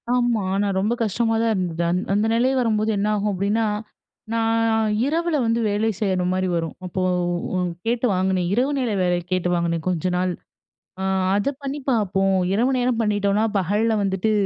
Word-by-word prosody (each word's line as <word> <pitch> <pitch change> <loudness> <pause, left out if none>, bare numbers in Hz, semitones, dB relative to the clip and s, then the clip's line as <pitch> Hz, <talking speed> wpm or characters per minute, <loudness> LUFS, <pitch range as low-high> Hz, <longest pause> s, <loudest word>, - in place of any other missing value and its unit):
ஆமா. 240 -3 +1
ஆனா, 205 +1 +1
ரொம்ப 210 +4 +1
கஷ்டமா 225 +2 0
தான் 230 -1 +2
இருந்தது. 175 -3 -2
அந் 180 - +1
அந்த 205 +2 +2
நிலை 245 +3 +2
வரும்போது 220 -2 +1
என்ன 200 +1 0
ஆகும்? 210 0 0
அப்படின்னா, 205 +4 0 0.7
நான் 225 0 +1 0.4
இரவுல 330 +3 0
வந்து 230 +1 +1
வேலை 210 +2 +1
செய்யுற 190 -4 0
மாரி 185 0 0
வரும். 165 -1 -3
அப்போ 185 +1 -3 0.8
கேட்டு 235 +2 0
வாங்கினேன். 185 -1 0
இரவு 255 +5 +1
நேர 250 -4 0
வேலை 180 -1 +2
கேட்டு 180 -1 0
வாங்கினேன். 170 -1 0
"கொஞ்ச 180 -1 0
நாள், 180 0 0 0.7
ஆ 190 - -2 0.3
அத 205 +6 +1
பண்ணி 280 +1 -3
பார்ப்போம்" 195 -4 +1 0.2
இரவு 240 +6 +2
நேரம் 245 -1 0
பண்ணிட்டோனா, 205 0 +1
பகல்ல 210 +5 +1
வந்துட்டு 195 +2 0
205 Hz, 160 wpm, -22 LUFS, 185-230 Hz, 0.8 s, தான்